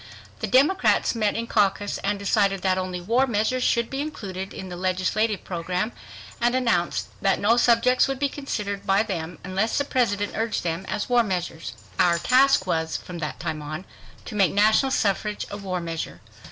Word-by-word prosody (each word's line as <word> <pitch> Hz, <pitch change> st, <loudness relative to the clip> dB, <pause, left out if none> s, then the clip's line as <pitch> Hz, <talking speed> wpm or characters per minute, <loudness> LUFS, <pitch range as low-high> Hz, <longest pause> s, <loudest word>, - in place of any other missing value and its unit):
The -, -, -2 dB
Democrats 290 Hz, +9 st, +3 dB
met 215 Hz, -3 st, 0 dB
in 230 Hz, -, -2 dB
caucus 205 Hz, -2 st, +1 dB
and 205 Hz, +1 st, -1 dB
decided 200 Hz, -1 st, +1 dB
that 185 Hz, -1 st, +2 dB
only 185 Hz, -1 st, -3 dB
"war 235 Hz, +9 st, +2 dB
measures" 235 Hz, +3 st, 0 dB
should 235 Hz, -1 st, +2 dB
be 270 Hz, +3 st, -3 dB
included 195 Hz, -11 st, -5 dB
in 190 Hz, -, -7 dB
the 180 Hz, -, -6 dB
legislative 185 Hz, +3 st, 0 dB
program, 180 Hz, +4 st, -2 dB, 0.5 s
and 240 Hz, +1 st, +2 dB
announced 205 Hz, -9 st, 0 dB
that 195 Hz, -1 st, +2 dB
no 215 Hz, +3 st, +4 dB
subjects 240 Hz, +1 st, +4 dB
would 270 Hz, -1 st, -2 dB
be 285 Hz, +1 st, +1 dB
considered 210 Hz, -8 st, -4 dB
by 195 Hz, +2 st, +4 dB
them, 175 Hz, -5 st, -5 dB
unless 190 Hz, +5 st, -1 dB
the 285 Hz, -, +1 dB
President 205 Hz, -7 st, 0 dB
urged 225 Hz, 0 st, -1 dB
them 170 Hz, +2 st, -3 dB
as 210 Hz, -1 st, -2 dB
war 245 Hz, -1 st, +4 dB
measures. 175 Hz, -, -3 dB, 0.3 s
Our 170 Hz, -1 st, +4 dB
task 255 Hz, +1 st, +4 dB
was, 160 Hz, -3 st, -1 dB
from 175 Hz, -2 st, -8 dB
that 155 Hz, -2 st, -4 dB
time 160 Hz, -2 st, -3 dB
on, 155 Hz, +5 st, -6 dB, 0.4 s
to -, -, -7 dB
make 200 Hz, -3 st, +3 dB
national 215 Hz, +6 st, +4 dB
suffrage 210 Hz, -1 st, 0 dB
a 205 Hz, -, -4 dB
war 190 Hz, -3 st, -3 dB
measure. 165 Hz, -, -5 dB
200 Hz, 180 wpm, -24 LUFS, 180-235 Hz, 0.5 s, no